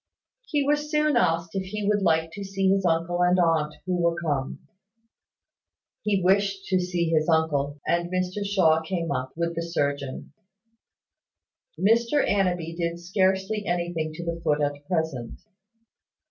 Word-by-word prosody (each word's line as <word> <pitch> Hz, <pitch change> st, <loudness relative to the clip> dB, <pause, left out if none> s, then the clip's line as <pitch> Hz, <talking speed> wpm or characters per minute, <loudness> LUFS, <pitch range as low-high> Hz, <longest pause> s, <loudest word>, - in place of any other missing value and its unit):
He 295 Hz, -3 st, +1 dB
was 295 Hz, +1 st, +1 dB
soon 300 Hz, -1 st, +2 dB
asked 165 Hz, 0 st, +1 dB
if 195 Hz, -, -1 dB
he 210 Hz, +1 st, -4 dB
would 210 Hz, -1 st, +2 dB
like 160 Hz, -3 st, +2 dB
to 200 Hz, +3 st, -7 dB
see 195 Hz, 0 st, 0 dB
his 195 Hz, -1 st, +1 dB
uncle 170 Hz, +1 st, 0 dB
and 180 Hz, +1 st, +4 dB
aunt, 165 Hz, -3 st, +2 dB
who 180 Hz, -1 st, 0 dB
were 170 Hz, 0 st, +2 dB
come. 145 Hz, -6 st, -3 dB, 1.3 s
He 200 Hz, -3 st, 0 dB
wished 195 Hz, +1 st, +2 dB
to 185 Hz, -, +3 dB
see 180 Hz, -2 st, -1 dB
his 155 Hz, 0 st, +2 dB
uncle; 150 Hz, -3 st, +1 dB
and 170 Hz, 0 st, 0 dB
Mr 185 Hz, +2 st, -2 dB
Shaw 180 Hz, -6 st, +3 dB
came 165 Hz, -1 st, -3 dB
up, 130 Hz, -1 st, -2 dB
with 170 Hz, 0 st, -1 dB
the 165 Hz, -, -3 dB
surgeon. 140 Hz, -5 st, -3 dB, 1.5 s
Mr 235 Hz, +7 st, +3 dB
Annanby 180 Hz, -4 st, 0 dB
did 170 Hz, 0 st, -2 dB
scarcely 190 Hz, +3 st, 0 dB
anything 170 Hz, -2 st, -1 dB
to 170 Hz, +2 st, -7 dB
the 170 Hz, 0 st, -3 dB
foot 150 Hz, 0 st, +2 dB
at 145 Hz, 0 st, -2 dB
present. 160 Hz, -9 st, -2 dB
175 Hz, 150 wpm, -25 LUFS, 160-195 Hz, 1.5 s, and